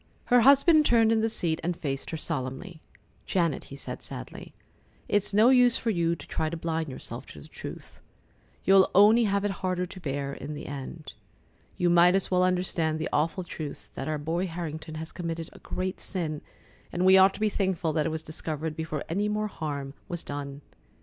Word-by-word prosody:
Her 245 Hz, -, +7 dB
husband 280 Hz, +5 st, +6 dB
turned 230 Hz, -5 st, +4 dB
in 225 Hz, -1 st, +3 dB
the 225 Hz, -, +1 dB
seat 165 Hz, -7 st, -1 dB
and 175 Hz, 0 st, -1 dB
faced 135 Hz, -2 st, -4 dB
her 160 Hz, -, -3 dB
solemnly. 155 Hz, +3 st, -4 dB, 0.5 s
"Janet," 170 Hz, -5 st, 0 dB
he 140 Hz, -, -10 dB
said 140 Hz, -, -7 dB
sadly, -, -, -9 dB, 0.5 s
"it's 205 Hz, 0 st, +1 dB
no 215 Hz, +4 st, +5 dB
use 250 Hz, -2 st, +5 dB
for 230 Hz, -, -1 dB
you 170 Hz, -3 st, +1 dB
to 145 Hz, -, -11 dB
try 155 Hz, -, -1 dB
to 170 Hz, -, -4 dB
blind 160 Hz, -1 st, -2 dB
yourself 130 Hz, -1 st, -7 dB
to 75 Hz, -, -11 dB
the 70 Hz, -, -12 dB
truth. -, -, -10 dB, 0.6 s
You'll 195 Hz, 0 st, +6 dB
only 215 Hz, +4 st, +7 dB
have 200 Hz, 0 st, +1 dB
it 205 Hz, -, +1 dB
harder 185 Hz, -1 st, 0 dB
to 185 Hz, -, -10 dB
bear 140 Hz, -3 st, -3 dB
in 150 Hz, +1 st, -6 dB
the -, -, -7 dB
end. 140 Hz, +2 st, -7 dB, 0.6 s
You 175 Hz, -1 st, +2 dB
might 175 Hz, +1 st, +6 dB
as 195 Hz, -, +1 dB
well 180 Hz, 0 st, +4 dB
understand 180 Hz, -3 st, +1 dB
the 160 Hz, -, -3 dB
awful 160 Hz, +4 st, +1 dB
truth 155 Hz, -4 st, -7 dB
that 135 Hz, -, -5 dB
our 155 Hz, -1 st, -1 dB
boy 165 Hz, +5 st, -2 dB
Harrington 160 Hz, -2 st, -6 dB
has 160 Hz, +1 st, -6 dB
committed 165 Hz, -2 st, -5 dB
a -, -, -14 dB
great 185 Hz, +1 st, -4 dB
sin, 160 Hz, -6 st, -3 dB, 0.5 s
and 180 Hz, +1 st, 0 dB
we 190 Hz, 0 st, +8 dB
ought 190 Hz, +1 st, +6 dB
to -, -, -9 dB
be 215 Hz, -, +2 dB
thankful 185 Hz, -6 st, -1 dB
that 155 Hz, 0 st, +1 dB
it -, -, -2 dB
was 160 Hz, 0 st, -3 dB
discovered 155 Hz, 0 st, -4 dB
before 160 Hz, -2 st, -4 dB
any 200 Hz, +5 st, 0 dB
more 210 Hz, 0 st, -1 dB
harm 140 Hz, -6 st, -5 dB
was 175 Hz, -1 st, -5 dB
done. 145 Hz, 0 st, -6 dB
170 Hz, 200 wpm, -27 LUFS, 155-190 Hz, 0.6 s, we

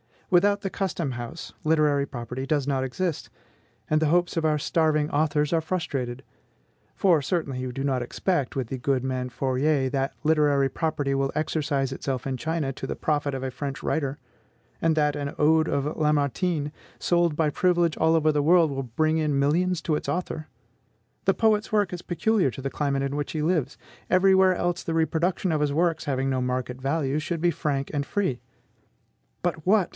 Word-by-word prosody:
Without 200 Hz, +3 st, +4 dB
the 195 Hz, -, -2 dB
custom 180 Hz, -7 st, -2 dB
house, 120 Hz, +6 st, -7 dB
literary 150 Hz, -3 st, +3 dB
property 125 Hz, +1 st, -5 dB
does 145 Hz, -2 st, +1 dB
not 135 Hz, -2 st, 0 dB
exist, 165 Hz, +5 st, -3 dB, 0.6 s
and 155 Hz, 0 st, +2 dB
the 155 Hz, -, +3 dB
hopes 175 Hz, +3 st, +2 dB
of 160 Hz, -, +1 dB
our 155 Hz, -1 st, +3 dB
starving 155 Hz, 0 st, +1 dB
authors 150 Hz, 0 st, +1 dB
are 165 Hz, -, +4 dB
frustrated. 135 Hz, -7 st, -3 dB, 0.7 s
For, 175 Hz, -6 st, +3 dB
certainly 140 Hz, -3 st, -2 dB
you 125 Hz, -1 st, -4 dB
do 135 Hz, +2 st, -3 dB
not 135 Hz, -3 st, 0 dB
expect, 140 Hz, +3 st, -1 dB
with 130 Hz, -4 st, -2 dB
the 135 Hz, -, -3 dB
good 130 Hz, 0 st, 0 dB
man 130 Hz, -1 st, -2 dB
Fourier, 135 Hz, +2 st, +1 dB
that 135 Hz, +1 st, -1 dB
literary 150 Hz, -3 st, +3 dB
property 145 Hz, -3 st, -1 dB
will 135 Hz, 0 st, 0 dB
exercise 145 Hz, -3 st, -1 dB
itself 135 Hz, -1 st, -3 dB
in 135 Hz, -1 st, -2 dB
China 160 Hz, 0 st, -2 dB
to -, -, -6 dB
the -, -, -3 dB
profit 145 Hz, -2 st, -1 dB
of 130 Hz, -, -4 dB
a 130 Hz, -, -2 dB
French 135 Hz, +1 st, -5 dB
writer; 140 Hz, -3 st, -1 dB, 0.6 s
and 165 Hz, -1 st, +2 dB
that 150 Hz, -1 st, +1 dB
an 140 Hz, -1 st, -4 dB
ode 160 Hz, +1 st, +4 dB
of 140 Hz, +2 st, -1 dB
Lamartine, 150 Hz, +1 st, +1 dB, 0.3 s
sold 170 Hz, -3 st, +2 dB
by 155 Hz, -1 st, +2 dB
privilege 175 Hz, 0 st, +2 dB
all 160 Hz, +1 st, +3 dB
over 155 Hz, -1 st, +3 dB
the 150 Hz, -1 st, +1 dB
world, 165 Hz, 0 st, +4 dB
will 135 Hz, 0 st, -3 dB
bring 155 Hz, +6 st, 0 dB
in 150 Hz, -3 st, +1 dB
millions 165 Hz, +5 st, +1 dB
to 160 Hz, -1 st, 0 dB
its -, -, -4 dB
author! 165 Hz, -3 st, -3 dB, 0.8 s
The -, -, +3 dB
poet's 215 Hz, -1 st, +2 dB
work 205 Hz, -4 st, +2 dB
is 175 Hz, -1 st, -5 dB
peculiar 190 Hz, -1 st, +1 dB
to 125 Hz, -, -8 dB
the 135 Hz, 0 st, -3 dB
climate 140 Hz, -2 st, -1 dB
in 140 Hz, +1 st, -2 dB
which 145 Hz, -, -3 dB
he 155 Hz, -, -1 dB
lives; 155 Hz, -4 st, 0 dB, 0.3 s
every 190 Hz, +1 st, +5 dB
where 190 Hz, -1 st, +5 dB
else 175 Hz, 0 st, -1 dB
the 165 Hz, -, -3 dB
reproduction 170 Hz, +3 st, +1 dB
of 155 Hz, -2 st, 0 dB
his 145 Hz, -1 st, +1 dB
works, 165 Hz, 0 st, +1 dB
having 135 Hz, -2 st, 0 dB
no 130 Hz, -1 st, 0 dB
market 125 Hz, 0 st, -3 dB
value, 140 Hz, +1 st, 0 dB
should 165 Hz, +1 st, -3 dB
be 175 Hz, 0 st, +3 dB
frank 140 Hz, -4 st, -2 dB
and 145 Hz, -1 st, -1 dB
free. 185 Hz, -12 st, -1 dB, 1.0 s
But 170 Hz, -2 st, -2 dB
what! 200 Hz, -2 st, +4 dB
150 Hz, 190 wpm, -26 LUFS, 135-165 Hz, 1.0 s, every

